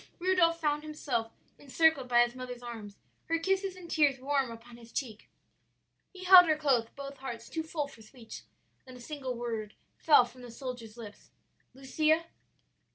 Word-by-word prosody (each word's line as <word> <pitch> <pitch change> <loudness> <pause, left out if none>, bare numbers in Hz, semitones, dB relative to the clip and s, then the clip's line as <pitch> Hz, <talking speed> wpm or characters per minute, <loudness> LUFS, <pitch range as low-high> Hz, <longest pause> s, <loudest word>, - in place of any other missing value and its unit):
"Rudolph 345 -2 +2
found 300 -2 0
himself 275 -7 -3 0.3
encircled 285 0 +2
by 240 -1 +6
his 240 0 -3
mother's 250 -1 -8
arms, 220 -4 -8 0.3
her 330 - 0
kisses 385 +2 -1
and 365 -2 -11
tears 290 -5 +2
warm 275 -1 0
upon 230 +1 -12
his 230 -1 -15
cheek. 230 -5 -5 0.8
"He 370 -1 -11
held 365 -1 +9
her 310 -1 +2
close, 265 -7 +2
both 280 0 -8
hearts 240 -4 -7
too 320 - -3
full 315 -2 -3
for 255 -5 -16
speech. 225 +1 -12 0.5
Then 255 - -11
a - - -14
single 265 -1 -5
word 225 -3 -5 0.2
fell 295 -6 +6
from 250 +1 -15
the 245 - -10
soldier's 240 -2 -8
lips, 210 -3 -11 0.5
'Lucia?' 310 +5 +1
265 Hz, 165 wpm, -30 LUFS, 240-315 Hz, 0.8 s, held